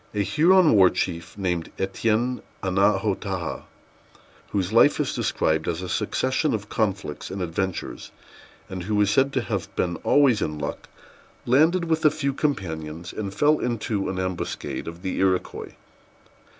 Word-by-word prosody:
A 105 - +2
Huron 170 - +5
war 95 -3 +7
chief, 85 +2 -3
named 90 -4 -2
Étienne 115 +6 0 0.2
Annaotaha, 95 +1 0 0.8
whose 95 0 -1
life 145 +5 +5
is - - 0
described 80 0 0
as 85 +2 -2
a - - -4
succession 130 - 0
of 105 -1 -6
conflicts 100 -9 -2
and 95 - -5
adventures, 90 +1 -3 0.6
and 95 -1 -6
who 105 +1 0
is 105 -1 +3
said 135 +5 +3
to - - +1
have - - -3
been 85 -1 -1
always 135 -7 +3
in 75 0 -2
luck, 75 -1 -5 0.6
landed 160 +8 +4
with 160 -1 0
a 155 - +7
few 145 -2 -2
companions, 85 - -3
and 100 -3 -4
fell 150 +8 +3
into 110 -4 -2
an 95 - -3
ambuscade 95 -3 -4
of 85 +1 -8
the 95 - -2
Iroquois. 95 -1 0
100 Hz, 150 wpm, -24 LUFS, 90-130 Hz, 0.8 s, war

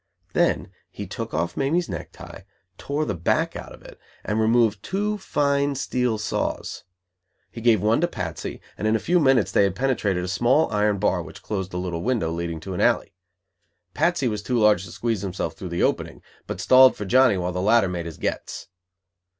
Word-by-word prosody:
Then - - +1 0.2
he - - -7
took - - -6
off 85 +2 -2
Mamie's 160 +6 0
neck - - -6
tie, 95 - -12 0.3
tore 145 +2 -2
the 105 - -2
back 85 -2 0
out - - -8
of - - -14
it, - - -14 0.3
and 105 +1 -1
removed 110 -2 +3
two 210 - -2
fine 140 -4 0
steel 125 -3 -1
saws. 105 -2 -3 0.7
He 115 - -8
gave 110 -4 +3
one 110 +6 +3
to 175 - +3
Patsy, 85 - -5 0.2
and 110 - 0
in 110 - +3
a - - +1
few 175 - +2
minutes 135 -7 +3
they - - +3
had 100 -2 0
penetrated 105 -8 0
a - - -3
small 120 - +2
iron 105 -1 +1
bar - - +1
which - - -11
closed 95 -3 -3
a 90 - -4
little 90 -2 -3
window 110 -7 0
leading 85 -1 -3
to 95 +3 -6
an 90 - -2
alley. - - +2 0.8
Patsy 170 -6 +1
was 105 -3 -2
too 120 +5 -1
large 105 -4 +4
to 85 - -11
squeeze 115 -2 -2
himself 95 -2 -3
through 95 - -7
the 85 - -1
opening, - - -1 0.2
but - - -5
"stalled" 130 0 +6
for 105 - -5
Johnny 125 0 +4
while 90 0 -2
the 90 - -2
latter 110 +1 +4
"made 85 -2 -4
his 80 - -8
gets". - - -4
105 Hz, 200 wpm, -24 LUFS, 90-130 Hz, 0.8 s, stalled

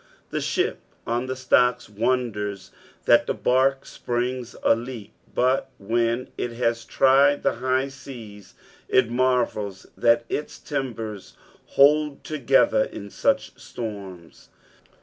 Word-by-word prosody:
The - - -2
ship - - -1 0.3
on 120 +2 -1
the 130 - -3
stocks 125 -1 +2
wonders 105 -3 -2 0.3
that - - +5
the - - 0
barque 135 +2 +2
springs 125 0 -3
a - - +5
leak, 115 -3 -8 0.2
but 130 +1 +2
when 115 +4 0
it 120 - -2
has 115 -1 -1
tried 140 +3 +4
the - - +1
high 130 +1 +1
seas, 110 -8 -11 0.3
it 130 -3 +3
marvels 120 -6 0
that 115 0 +3
its 150 - -4
timbets 115 -8 -5 0.4
hold 150 +1 +4
together 135 -6 +3
in 100 0 -9
such - - +1
storms. 100 -7 -8
120 Hz, 120 wpm, -24 LUFS, 110-130 Hz, 0.4 s, that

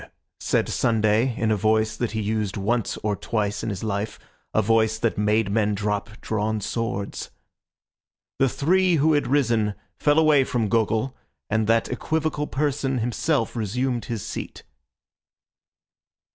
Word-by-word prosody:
said - - +1
Sunday 110 +2 +2
in 110 -1 +1
a - - +3
voice 110 +1 +1
that 115 0 -2
he 110 - -1
used 105 -1 -1
once 115 +3 0
or 105 -1 0
twice 105 -1 -2
in - - -3
his 100 -1 -4
life, 105 0 -2 0.3
a - - +2
voice 110 +1 +2
that 115 -1 0
made 105 0 +1
men 105 -1 +1
drop 105 +1 -2
drawn 110 0 -1
swords. 110 -1 -3 1.1
The 135 - +4
three 180 +7 +2
who 155 +1 +3
had 145 - +1
risen 115 -7 +2 0.2
fell 145 0 +3
away 155 -3 +5
from 115 -5 -1
Gogol, 115 +3 +1 0.4
and 110 0 +1
that 115 0 +3
equivocal 155 -2 -1
person 140 -2 -1
himself 120 +3 0
resumed 120 +3 -1
his 115 -4 -4
seat. - - -6
110 Hz, 145 wpm, -24 LUFS, 105-130 Hz, 1.1 s, away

